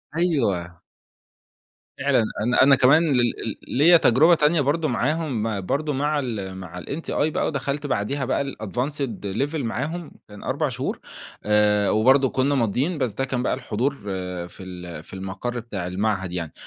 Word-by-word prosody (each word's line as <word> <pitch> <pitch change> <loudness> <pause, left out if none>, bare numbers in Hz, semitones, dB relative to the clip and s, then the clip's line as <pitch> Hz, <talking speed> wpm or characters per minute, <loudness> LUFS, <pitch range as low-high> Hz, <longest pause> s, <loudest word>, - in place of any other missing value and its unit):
أيوه. 105 - 0 1.2
فعلًا، 135 -4 +3 0.2
أنا 120 +3 +4
أنا 135 0 +7
كمان 140 +6 +5
ل - - +3
ل 115 -2 -1 0.2
ليّا 170 +4 +7
تجربة 160 +4 +5
تانية 150 +1 +3
برضه 155 +3 +1
معاهم 125 -6 -1
برضه 150 +8 -1
مع 145 +2 0
ال 100 -8 -4
مع 90 -1 -8
الMTI 160 +4 -6 0.2
بقى - - 0
ودخلت 140 0 -3
بعديها 130 +3 -1
بقى 125 - 0
الadvanced 125 -1 -4
level 135 +11 -2
معاهم، 150 +6 -3 0.2
كان 105 -1 -12
4 - - -1
شهور، - - -3 0.4
آآ 105 -1 +3
وبرضه 130 +5 +4
كنّا 135 +2 +1
ماضيين 130 - 0
بس 130 -5 0
ده 135 +7 -2
كان 125 -2 -2
بقى - - +1
الحضور 130 +6 -1 0.5
في 95 - -13
ال 90 -4 -8
في - - -17
المقر 95 +6 -4
بتاع 100 -6 -5
المعهد 95 -1 -1
يعني، 85 -3 -4
125 Hz, 155 wpm, -23 LUFS, 105-145 Hz, 1.2 s, أنا